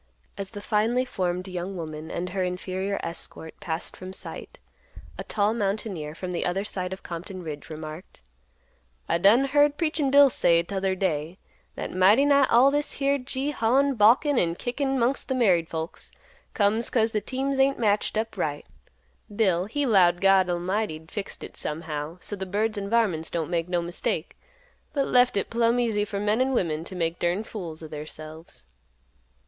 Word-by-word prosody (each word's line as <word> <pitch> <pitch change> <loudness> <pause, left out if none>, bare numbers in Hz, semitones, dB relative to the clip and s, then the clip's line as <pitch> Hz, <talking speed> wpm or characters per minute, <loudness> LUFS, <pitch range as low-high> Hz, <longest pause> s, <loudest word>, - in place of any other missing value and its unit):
As 195 -1 -4
the 205 -1 -8
finely 225 +5 +1
formed 180 -5 -2
young 185 +1 -5
woman 155 -1 -6
and 180 +1 -3
her 190 0 -2
inferior 185 +2 -2
escort 165 -1 -6
passed 160 0 -4
from 185 0 -8
sight, - - -8 0.6
a - - -3
tall 210 0 +1
mountaineer, 195 -8 -2
from 180 +1 -5
the 175 - -2
other 185 +3 -1
side 185 -3 -4
of 190 - -7
Compton 180 +2 -7
Ridge, 150 -2 -7
remarked, 155 - -9 0.9
"I 170 - +1
done 220 +9 +5
heard 290 +1 +3
Preachin' 310 -4 0
Bill 280 0 +7
say 170 -5 +3
t'other 190 +1 -1
day, 170 -2 -2 0.4
that - - -5
'mighty 200 +9 +5
nigh 280 -2 +5
all 255 +4 +6
this 290 +1 -1
here 280 0 +1
gee 265 +3 -3
hawin', 275 +2 +2
balkin', 245 +5 +4
and 170 0 0
kickin' 270 +2 -1
'mongst 255 +4 0
th' 260 - +1
married 180 -9 +3
folks 160 0 -6 0.4
comes 215 +2 +2
'cause 225 -2 +2
th' 210 -1 -1
teams 270 +1 -2
ain't 275 +1 +3
matched 210 -1 +1
up 225 0 -2
right.' 150 -5 -2 0.7
Bill 185 -5 +2
he 285 +8 -1
'lowed 180 -7 +4
God 195 -1 +5
'lmighty 180 +1 -1
'd 160 0 -18
fixed 205 -2 -5
hit - - -9
somehow 155 +1 -4
so 205 - -3
th' 190 -1 -6
birds 215 +3 0
an' 200 -1 -4
varmints 200 -9 +1
don't 170 -1 -3
make 170 0 -1
no 175 -1 0
mistake, 175 +1 -3 0.6
but 280 -2 +1
left 250 -2 +4
hit 200 - -1
plumb 235 +1 +2
easy 220 -4 +1
for 200 -1 -4
men 210 +4 +1
an' 265 +1 +1
women 160 -8 0
t' 185 - -8
make 165 -1 -1
durned 180 +5 0
fools 170 -8 -7
o' - - -6
theirselves." 155 - -9
195 Hz, 180 wpm, -26 LUFS, 170-235 Hz, 0.9 s, Bill